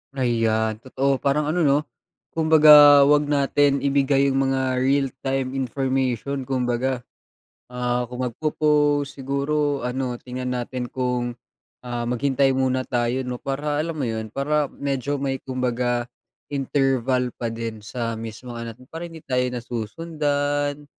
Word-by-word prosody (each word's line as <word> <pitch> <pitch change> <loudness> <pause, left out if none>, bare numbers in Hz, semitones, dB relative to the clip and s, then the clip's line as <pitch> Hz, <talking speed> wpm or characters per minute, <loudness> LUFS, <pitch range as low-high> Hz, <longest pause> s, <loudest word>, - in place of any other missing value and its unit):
Ayan 110 -4 +1
totoo 135 +2 -1
parang 150 +2 +1
ano 175 - 0
'no, 140 0 +4 0.5
kumbaga 150 -3 +8
huwag 145 +1 +4
natin 140 -1 +2
ibigay 140 0 +2
'yung 135 - +1
mga 130 -1 +1
realtime 135 0 0
information 135 0 -1
kumbaga. 125 -1 -1 0.6
Ah, 125 0 -1
kung 125 +1 -7
magpo-post, 145 +2 +1
siguro 140 +1 -1
ano 125 0 -2
tingnan 125 0 -4
natin 125 0 -3
kung, 125 -1 -2 0.5
ah, 120 -1 -4
maghintay 135 +2 +1
muna 130 0 0
tayo 120 +1 -1
'no, 125 -1 -5
para 145 +2 -1
alam 165 0 -4
mo 140 - -1
'yun, 110 -1 -3
para 145 +3 0
medyo 140 0 -2
may 135 -1 -2
kumbaga 125 -2 -1 0.5
interval 130 -2 0
pa 115 - -3
din 115 -1 -5
sa 115 +2 -4
mismong 115 +2 -7
ano, 115 0 -5 0.2
para 170 +1 -6
hindi 160 -2 -12
tayo 125 -1 +1
nasusundan. 145 +4 -2
135 Hz, 130 wpm, -23 LUFS, 125-145 Hz, 0.6 s, kumbaga